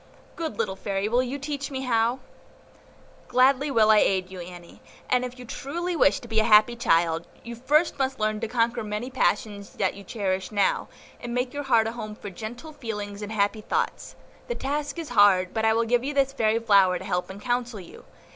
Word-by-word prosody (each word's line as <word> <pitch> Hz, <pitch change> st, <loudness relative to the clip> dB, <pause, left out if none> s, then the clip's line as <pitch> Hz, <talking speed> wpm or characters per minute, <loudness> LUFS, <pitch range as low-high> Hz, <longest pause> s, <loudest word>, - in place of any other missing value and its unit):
good 320 Hz, -11 st, -4 dB
little 190 Hz, -, -1 dB
Fairy, 195 Hz, +1 st, -2 dB
will 240 Hz, +3 st, +2 dB
you 255 Hz, +2 st, -3 dB
teach 285 Hz, 0 st, -4 dB
me 265 Hz, -2 st, -4 dB
how?" 235 Hz, -1 st, +1 dB, 1.1 s
"Gladly 260 Hz, +3 st, +3 dB
will 220 Hz, -5 st, +4 dB
I 215 Hz, -, +6 dB
aid 185 Hz, -2 st, +1 dB
you, 185 Hz, -, -8 dB
Annie, 175 Hz, -1 st, -11 dB, 0.3 s
and 250 Hz, 0 st, +2 dB
if 250 Hz, 0 st, -6 dB
you 250 Hz, -, -10 dB
truly 340 Hz, +9 st, -4 dB
wish 290 Hz, -, +3 dB
to 240 Hz, -, -11 dB
be 220 Hz, -1 st, +1 dB
a -, -, +3 dB
happy 220 Hz, +1 st, +5 dB
child, 165 Hz, -6 st, +1 dB, 0.2 s
you 235 Hz, 0 st, -7 dB
first 290 Hz, +7 st, +1 dB
must 265 Hz, 0 st, -1 dB
learn 215 Hz, 0 st, 0 dB
to 225 Hz, -, -3 dB
conquer 230 Hz, 0 st, 0 dB
many 215 Hz, +4 st, -4 dB
passions 205 Hz, -5 st, -1 dB
that 190 Hz, -, 0 dB
you 200 Hz, -, -11 dB
cherish 190 Hz, -3 st, -3 dB
now, 200 Hz, -2 st, +1 dB, 0.3 s
and 240 Hz, 0 st, -5 dB
make 250 Hz, 0 st, -1 dB
your 290 Hz, -, -3 dB
heart 230 Hz, -4 st, +4 dB
a 225 Hz, -, -2 dB
home 215 Hz, -2 st, -7 dB
for 205 Hz, -1 st, -8 dB
gentle 240 Hz, -, -8 dB
feelings 210 Hz, -6 st, -6 dB
and 210 Hz, 0 st, -6 dB
happy 215 Hz, 0 st, 0 dB
thoughts; -, -, -2 dB, 0.3 s
the 485 Hz, -, -3 dB
task 290 Hz, +1 st, -3 dB
is 330 Hz, -3 st, -5 dB
hard, 200 Hz, -5 st, +4 dB
but 220 Hz, -1 st, 0 dB
I 220 Hz, -, +4 dB
will 230 Hz, +1 st, +1 dB
give 240 Hz, +1 st, +2 dB
this 275 Hz, 0 st, 0 dB
fairy 220 Hz, -4 st, +2 dB
flower 200 Hz, -5 st, +4 dB
to -, -, -9 dB
help 180 Hz, 0 st, -2 dB
and 190 Hz, +1 st, -8 dB
counsel 240 Hz, 0 st, -2 dB
you. 180 Hz, -, -13 dB
225 Hz, 210 wpm, -25 LUFS, 205-255 Hz, 1.1 s, I